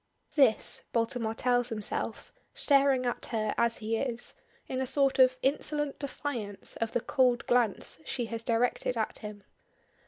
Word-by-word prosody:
This, 265 -8 +4
Baltimore 230 -1 0
tells 245 0 +1
himself, 215 -3 -4 0.2
staring 275 -3 +3
at 240 - -2
her 215 -2 -1
as 235 -1 +1
he 225 +1 -2
is, 240 -1 -2 0.3
in 260 0 -2
a 260 - -1
sort 275 0 +2
of 255 0 +6
insolent 295 +1 0
defiance 250 -8 -4
of 230 -1 -2
the 240 - +1
cold 250 -3 +2
glance 235 -8 +1
she 240 +7 -3
has 230 0 -5
directed 235 +1 0
at 220 - -2
him. 210 -1 -8
245 Hz, 150 wpm, -30 LUFS, 225-265 Hz, 0.3 s, of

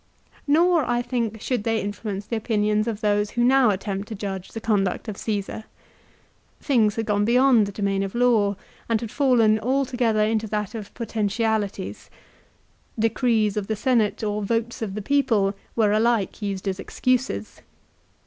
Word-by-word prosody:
Nor, 335 +2 +4
I 240 0 0
think, 235 -3 -2
should 240 0 -2
they 225 0 0
influence 205 -1 -4
the 230 - -3
opinions 215 -1 0
of 220 -2 -3
those 205 -1 +1
who 240 +2 0
now 260 -1 +5
attempt 200 0 -3
to 220 - -6
judge 195 -2 -5
the 225 - -6
conduct 205 -2 0
of 215 - -4
Csesar. 210 +1 -4 0.9
Things 220 -7 +2
had 225 - -2
gone 205 -1 +1
beyond 240 -1 +4
the - - -5
domain 200 -1 -1
of 195 +2 -4
law, 225 -5 +3 0.3
and 225 -1 +2
had 230 -1 -6
fallen 230 -6 +3
altogether 245 -3 +1
into 220 0 0
that 210 0 -3
of 215 -3 -7
potentialities. 215 - -2 0.9
Decrees 225 -2 +1
of 205 -2 -2
the 220 - -1
Seriate 225 -2 +1
or 210 0 -2
votes 230 +3 -2
of 200 -3 -3
the 210 - -4
people 225 -7 +2 0.2
were 215 -3 +3
alike 225 -1 +1
used 200 -1 -3
as 190 0 -2
excuses. 190 - -2
220 Hz, 160 wpm, -24 LUFS, 205-235 Hz, 0.9 s, now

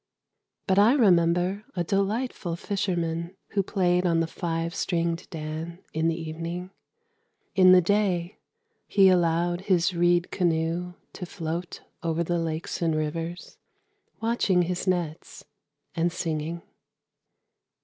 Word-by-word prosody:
But 190 +1 +3
I 215 +5 +6
remember 180 - +3
a 175 - 0
delightful 200 0 -1
fisherman 170 -2 -2
Who 200 - +1
played 180 -2 +1
on 170 -2 +2
the 165 - +2
five 165 0 -3
stringed 170 -1 -1
dan 160 +1 -5 0.2
in 160 +1 +1
the 165 0 0
evening. 165 +3 -5 0.8
In 185 -1 +7
the 185 0 +8
day 185 -2 0 0.5
he 195 -2 +5
allowed 175 0 +2
his 185 -2 +2
reed 175 0 +2
canoe 175 0 0 0.2
to 180 - -7
float 170 +1 -5 0.2
Over 165 0 0
the 175 +1 -1
lakes 160 +1 -3
and 165 -2 +1
rivers, 165 +3 -4 0.6
Watching 225 -6 +2
his 180 +2 -3
nets 175 -4 -2 0.5
and 170 0 0
singing. 165 0 -3
175 Hz, 120 wpm, -26 LUFS, 165-185 Hz, 0.8 s, the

